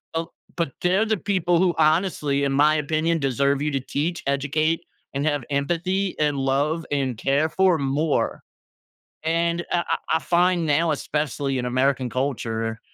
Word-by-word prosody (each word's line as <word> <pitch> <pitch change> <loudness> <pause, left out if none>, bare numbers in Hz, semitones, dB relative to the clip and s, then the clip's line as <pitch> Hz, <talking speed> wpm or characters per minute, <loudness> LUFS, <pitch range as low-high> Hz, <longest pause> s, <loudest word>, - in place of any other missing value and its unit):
o 165 0 -2 0.2
but 165 -5 -1
they're 185 +5 +2
the 220 -1 0
people 180 -3 +1
who 180 -1 +3
honestly, 155 -3 +2
in 140 - +1
my 150 +3 +4
opinion, 155 +2 0
deserve 140 +1 +1
you 150 - 0
to 135 - 0
teach, 155 +6 -3
educate, 145 +4 0 0.3
and 140 +1 -1
have 145 -3 0
empathy, 175 +7 -1
and 150 -2 +1
love, 145 +5 0
and 135 -5 -1
care 140 +6 +1
for 190 -1 +3
more. 140 +3 0 0.8
And 170 +1 0
I - - +2
I - - +1 0.2
I - - -5
find 175 +3 +2
now, 160 +3 +2
especially 145 -2 -2
in 125 - -2
American 130 +1 +1
culture, 115 -4 -2
150 Hz, 160 wpm, -23 LUFS, 140-170 Hz, 0.8 s, my